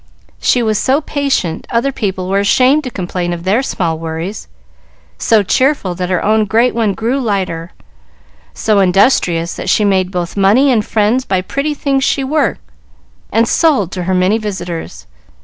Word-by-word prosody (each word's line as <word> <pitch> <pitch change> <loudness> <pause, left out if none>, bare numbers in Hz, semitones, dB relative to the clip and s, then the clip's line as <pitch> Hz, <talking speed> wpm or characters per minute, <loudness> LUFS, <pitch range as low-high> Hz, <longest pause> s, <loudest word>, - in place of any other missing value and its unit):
"She 240 - +2
was 215 -2 0
so 270 +3 +2
patient, 275 - -2
other 240 +4 0
people 190 -7 -3
were 195 +1 +1
ashamed 255 +9 +3
to - - -3
complain 180 -4 -3
of 170 -1 -6
their 200 +7 +2
small 170 -11 -2
worries; 165 +5 -5 0.7
so 220 -2 +3
cheerful, 255 -2 +1
that 180 0 -4
her 185 -2 0
own 215 +1 +2
great 230 +5 +2
one 220 -4 0
grew 240 +5 -1
lighter; 190 -8 -2 0.8
so 205 - +1
industrious, 180 -3 +2
that 185 - -4
she 210 - +3
made 190 -2 +1
both 180 -2 -4
money 210 +8 +4
and 220 -4 +2
friends 220 +5 +1
by 190 -6 -1
pretty 280 +10 -3
things 275 -2 0
she 275 - +1
worked 300 +4 0 0.7
and 230 +1 +2
sold 265 - +2
to 180 -2 -4
her 185 +1 0
many 185 +5 +2
visitors. 175 - -6
205 Hz, 165 wpm, -15 LUFS, 180-250 Hz, 0.8 s, money